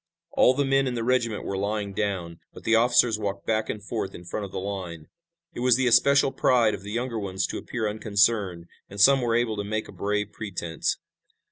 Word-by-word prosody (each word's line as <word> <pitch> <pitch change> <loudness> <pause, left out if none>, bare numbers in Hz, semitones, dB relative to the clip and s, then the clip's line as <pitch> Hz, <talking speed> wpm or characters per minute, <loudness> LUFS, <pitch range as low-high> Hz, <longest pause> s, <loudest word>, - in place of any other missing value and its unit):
All 130 - +4
the 140 +1 +1
men 135 0 +2
in 125 - -2
the 115 - -2
regiment 115 -3 0
were 95 -1 -3
lying 100 0 -2
down, 95 -5 -3 0.2
but - - -11
the 115 - +1
officers 115 -1 +4
walked 100 -1 -4
back 110 -1 0
and 105 - -4
forth 110 -2 -4
in 90 - -11
front 100 +4 -4
of - - -17
the - - -6
line. 95 -5 -5 0.5
It - - -7
was 125 -1 +4
the 130 +1 +1
especial 140 +3 +4
pride 120 -6 +3
of 100 - -5
the 100 +1 -8
younger 120 0 -2
ones 95 -2 -2
to - - -4
appear 115 -3 -3
unconcerned, 100 -4 +1 0.2
and 100 - -9
some 135 +6 +6
were 115 -2 +1
able 115 -2 0
to 100 - -2
make 110 +1 -3
a - - -11
brave 105 +2 -2
pretense. 85 -6 -3
105 Hz, 220 wpm, -26 LUFS, 100-120 Hz, 0.5 s, some